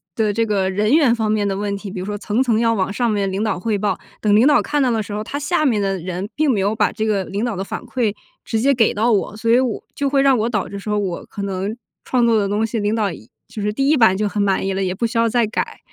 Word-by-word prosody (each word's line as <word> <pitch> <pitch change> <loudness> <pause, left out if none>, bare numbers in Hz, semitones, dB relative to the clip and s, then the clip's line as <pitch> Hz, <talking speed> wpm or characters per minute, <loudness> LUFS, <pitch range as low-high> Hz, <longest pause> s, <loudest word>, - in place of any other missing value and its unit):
的 215 -2 +1
这 230 +2 +1
个 195 -3 0
人 210 +6 +1
员 285 -7 +4
方 220 -2 0
面 205 -2 +1
的 195 - -1
问 200 0 -2
题， 200 0 -7
比 185 - -6
如 185 - -5
说 205 0 -4
层 210 +4 -1
层 230 -3 +1
要 230 -1 +2
往 195 -2 -1
上 235 +3 0
面 200 -2 0
领 195 - -2
导 215 -4 0
汇 215 +1 -1
报， 200 -1 -1 0.2
等 210 -1 +3
领 230 +5 +5
导 295 - +5
看 295 -1 -1
到 255 - +2
的 225 -1 0
时 205 - -8
候， 210 +1 -3
他 280 - -5
下 310 +2 0
面 235 -7 +2
的 195 -1 -1
人 185 +3 -4
并 300 -2 +2
没 210 - 0
有 200 +3 0
把 - - +2
这 220 - -3
个 200 -3 +1
领 205 +6 -3
导 235 -4 -2
的 190 - -3
反 - - -5
馈 230 -4 -1 0.3
直 225 - -1
接 275 +4 +3
给 230 -3 +3
到 225 +3 +1
我。 210 0 0
所 230 +1 -2
以 240 - +6
我 250 -4 -1
就 280 -1 0
会 275 -1 +2
让 270 -2 +5
我 225 +2 0
导 215 -4 -1
致 200 - -7
说 210 +1 -2
我 190 -4 -3
可 200 - -6
能 195 +3 -3 0.3
创 250 -2 +1
作 230 -2 +3
的 200 -1 0
东 210 +2 +1
西， 225 +1 -3
领 210 +1 0
导 205 -5 0
一 115 -8 -12 0.2
就 215 - -7
是 210 +1 0
第 270 +6 0
1 305 - +4
版 220 -7 +4
就 210 - 0
很 205 0 -2
满 195 -1 +1
意 195 - -1
了， 195 0 -1
也 185 0 -2
不 235 - -1
需 230 - -4
要 230 - +3
再 235 0 +2
改。 215 - -3
215 Hz, 330 characters per minute, -20 LUFS, 200-235 Hz, 0.3 s, 以